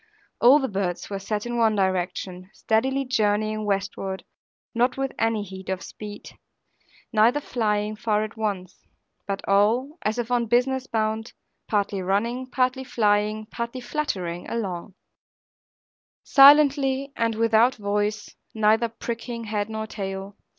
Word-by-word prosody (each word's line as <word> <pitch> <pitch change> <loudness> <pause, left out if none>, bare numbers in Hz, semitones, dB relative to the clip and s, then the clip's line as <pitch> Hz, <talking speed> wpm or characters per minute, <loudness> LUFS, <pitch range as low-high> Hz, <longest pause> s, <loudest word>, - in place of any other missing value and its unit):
All 250 +5 +7
the 270 -3 -1
birds 190 -3 -3
were 195 - -3
set 210 +2 -3
in 240 0 -2
one 220 -2 +3
direction, 185 -1 -2
steadily 265 +5 0
journeying 215 -3 0
westward, 195 -1 -2 0.5
not 245 +2 +1
with 270 0 -1
any 225 -2 +1
heat 190 -1 -9
of 190 0 -2
speed, 210 -1 -9 0.8
neither 230 +6 +4
flying 215 -5 -1
far 215 -1 0
at 215 - -6
once; 200 -5 -4 0.4
but 195 -1 -4
all 230 - +2
(as 215 +2 -1
if 240 0 -3
on 240 -1 +1
business 255 +3 +1
bound), 220 0 -2 0.3
partly 200 -2 0
running, 230 +7 -1
partly 255 +1 0
flying, 215 -3 +1
partly 235 +2 -4
fluttering 190 - -3
along; 195 -4 -4 1.3
silently, 275 -1 +6
and 230 -1 0
without 230 +3 +3
a - - -18
voice, 205 +1 -1 0.2
neither 220 +2 +3
pricking 230 +1 -5
head 210 -1 -2
nor 220 0 -4
tail. 195 -2 -6
220 Hz, 135 wpm, -24 LUFS, 205-240 Hz, 1.3 s, All